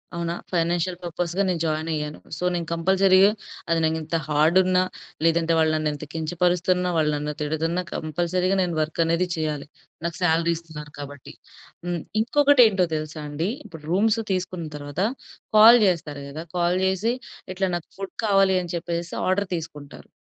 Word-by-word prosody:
అవునా? 170 0 -2 0.2
ఫైనాన్షియల్ 175 +1 0
పర్పస్‌గా 175 +2 -1
నేను 175 -2 -1
జాయిన్ 155 0 -1
అయ్యాను. 150 -1 -4 0.2
సో, - - -6
నేను 170 -2 -3
కంపల్సరీగా 190 +3 +4 0.4
అది 165 0 +2
నాకు 160 0 +1
ఇంత 160 +2 -4
హార్డున్నా 180 +5 +3 0.4
లేదంటే 165 0 +3
వాళ్ళు 160 -1 +3
నన్ను 155 -1 0
ఇంత 145 +1 -7
కించపరుస్తున్నా, 180 +2 +1
వాళ్ళు 155 -1 +2
నన్ను 150 +1 -3
తిడుతున్నా 160 +4 -1
కంపల్సరీగా 175 +4 -1
నేను 175 -2 -1
వర్క్ 155 +2 -1
అనేది 170 +2 +1
చేయాలి. 155 -3 -3 0.4
నాకు 170 -1 -3
సాలరీ 170 0 +3
ఇస్తున్నారు 150 -3 -10
కాబట్టి. 145 -1 -9 0.5
హ్మ్‌. 175 -2 -2 0.2
ఇంకొకటేంటో 245 -7 +5
తెలుసా 155 0 -5
అండి. 160 +6 -2 0.2
ఇప్పుడు 160 -6 -11
రూమ్సు 220 +4 +2
తీసుకున్న 185 -3 -2
తర్వాత 145 +3 -5 0.6
కాల్ 230 +3 +9
చేస్తారు 150 -5 -2
కదా! 155 +3 -6
కాల్ 175 +1 +2
జేసి 190 +5 +1 0.4
ఇట్లా, 190 0 0
"నాకు 170 - -12
ఫుడ్ 195 0 -7
కావాలి" 195 -2 +4
అని 175 - -6
చెప్పేసేసి 170 0 -4
ఆర్డర్ 195 +2 +1
తీసుకుంటారు. 150 -3 -10
170 Hz, 150 wpm, -24 LUFS, 155-185 Hz, 0.6 s, కాల్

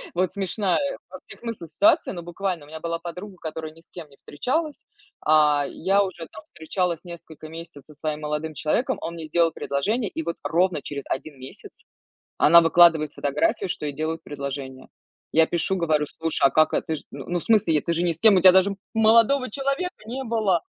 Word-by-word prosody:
вот 180 0 +1
смешная 200 +6 -1
во - - -10
всех - - -13
смыслах 230 -9 -6
ситуация, 320 +1 +3
ну 175 - -6
буквально. 175 -1 -3
У - - -19
меня 160 - -7
была 165 0 -3
подруга, 180 +4 -8
которая 155 0 -6
ни 165 - -17
с - - -27
кем 165 -4 -9
не 140 - -19
встречалась, 285 - -3 0.4
а 150 -2 +4
я 195 +3 +1
уже 175 -4 -6
там 155 - -11
встречалась 170 +1 -3
несколько 160 -2 -10
месяцев 165 -4 -10
со 150 - -15
своим 155 0 -4
молодым 150 +1 -3
человеком, 160 +11 0
он 170 +1 -5
мне 165 -1 -7
сделал 165 +1 +2
предложение, 205 - -1
и 160 - -4
вот 170 +1 -4
ровно 170 -2 +1
через 140 0 -6
1 145 +1 -4
месяц 130 +1 -12 0.6
она 170 +2 +7
выкладывает 165 -2 +5
фотографию, 150 - 0
что 150 - -4
ей 145 - -4
делают 160 +1 -3
предложение. 140 -2 -6 0.5
Я 160 0 +5
пишу, 175 +2 0
говорю: 155 -4 +1
"Слушай, 160 -3 -1
а - - -4
как 155 0 +3
это? - - -1
Ты 160 - -1
ж, - - -7
ну, 160 +6 -4
в - - -8
смысле, 210 -7 +3
е 150 - +2
ты 170 - -1
же 170 - 0
ни 175 - +2
с 160 - -18
кем, 220 -3 +6
у - - +3
тя 185 - +9
даже 190 +2 +3 0.2
молодого 230 +4 +4
человека 275 - -3
не 265 +3 -4
было!" 215 -7 +1
170 Hz, 205 wpm, -24 LUFS, 155-195 Hz, 0.6 s, тя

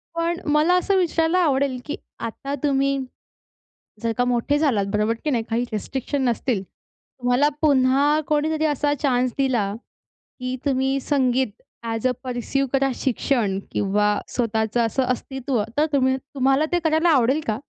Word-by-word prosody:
पण 340 +1 -1
मला 310 +4 +4
असं 390 +2 +1
विचारायला 335 0 +2
आवडेल, 275 -5 +1
की 295 - -3 0.2
आता 275 +5 -4
तुम्ही 275 -1 +2 1.1
जर 230 - +1
का 245 - +2
मोठे 245 +4 +1
झालात 235 -11 +2
बरोबर, 210 +2 +2
की 305 - 0
नाही 235 -5 0
काही 235 +1 0
रिस्ट्रिक्शन 265 +6 -3
नसतील. 235 -3 -1
तुम्हाला 245 +7 -2
पुन्हा 280 0 +3
कोणीतरी 310 +1 +1
असा 290 0 +1
चान्स 255 -3 +1
दिला, 240 -7 +1 0.7
की 255 0 -3
तुम्ही 270 0 +1
संगीत 260 -5 0 0.2
ॲज 225 +1 -1
अ - - +2
परसिव 255 +2 -1
करा 270 0 +3
शिक्षण 235 -6 0
किंवा 205 +1 +1 0.2
स्वतःचं 225 -1 0
असं 260 +4 0
अस्तित्व 255 -2 -2
तर 300 - +4
तुम्ही 260 -1 +3
तुम्हाला 270 +2 +1
ते 350 - +2
करायला 320 +1 +3
आवडेल 275 0 +3
का? 215 +1 -1
265 Hz, 145 wpm, -23 LUFS, 240-290 Hz, 1.1 s, मला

